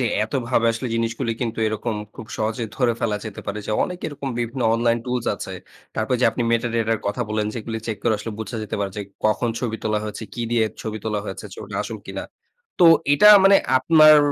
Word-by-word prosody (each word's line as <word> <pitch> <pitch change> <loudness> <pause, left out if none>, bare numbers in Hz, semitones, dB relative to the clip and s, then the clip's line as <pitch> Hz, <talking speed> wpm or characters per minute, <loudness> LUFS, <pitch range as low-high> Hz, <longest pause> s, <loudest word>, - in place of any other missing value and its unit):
যে, - - +1 0.2
এতভাবে 120 0 0
আসলে 115 +3 -4
জিনিসগুলি 115 0 -1
কিন্তু 115 -3 -2
এরকম 110 +1 -2 0.2
খুব 110 - -9
সহজে 110 +2 -1
ধরে 125 -3 +2
ফেলা 110 -3 0
যেতে 110 -2 -7
পারে। 100 +1 -3
যে - - -2
অনেক 180 -1 -6
এরকম 140 -2 -5
বিভিন্ন 120 +2 -2
অনলাইন 115 0 +2
টুলস 125 -2 -2
আছে। - - -7 0.4
তারপর 110 +3 0
যে - - +3
আপনি 120 +2 -2
মেটাডাটার 115 -1 +1
কথা 105 +4 -1
বললেন, 105 0 -1
যেগুলি 115 -1 -4
চেক 110 -2 -2
করে 115 - +2
আসলে 110 +1 -5
বুঝা 110 +1 -5
যেতে 105 - -4
পারে, 100 -1 -1
যে 105 - -2 0.2
কখন 110 +3 +2
ছবি 115 -3 -2
তোলা 105 -1 +1
হয়েছে, 105 +1 -6
কি 120 - -3
দিয়ে 115 -2 +3 0.2
ছবি 110 -1 -4
তোলা 105 -1 -1
হয়েছে, - - -6
ছবিটা - - -7
আসল - - -6
কিনা। - - -5 0.6
তো 175 - +6 0.3
এটা 145 +9 +7 0.2
মানে 195 0 +8 0.2
আপনার 155 +1 +7
115 Hz, 205 wpm, -22 LUFS, 110-125 Hz, 0.6 s, মানে